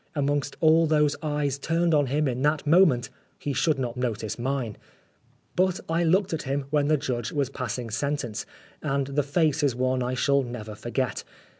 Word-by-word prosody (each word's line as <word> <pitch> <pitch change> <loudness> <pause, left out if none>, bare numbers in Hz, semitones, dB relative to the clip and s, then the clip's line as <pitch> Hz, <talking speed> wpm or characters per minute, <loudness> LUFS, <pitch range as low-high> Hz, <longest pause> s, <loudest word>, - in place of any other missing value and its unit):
Amongst 145 0 -1
all 160 +1 +5
those 150 -2 +3
eyes 145 -3 -1
turned 165 +3 +1
on 145 -2 +3
him 145 +3 +1
in 125 -1 -2
that 150 +2 +1
moment, 150 -6 +4 0.3
he 145 - -3
should 155 +1 +2
not 125 -2 -3
notice 110 -3 -2
mine. 125 -4 -2 0.8
But 185 0 +2
I 165 +1 +1
looked 185 +3 +2
at 160 - -1
him 140 0 -2
when 145 -1 +2
the 155 0 +3
judge 120 -4 -3
was 140 -3 -1
passing 120 -3 -4
sentence, 125 -2 -2 0.3
and 140 -2 0
the 140 +2 0
face 150 +1 +1
is 140 -5 +2
one 130 0 0
I 125 +1 -1
shall 140 +1 +3
never 120 -4 -6
forget. 120 +4 -2
140 Hz, 180 wpm, -26 LUFS, 125-155 Hz, 0.8 s, all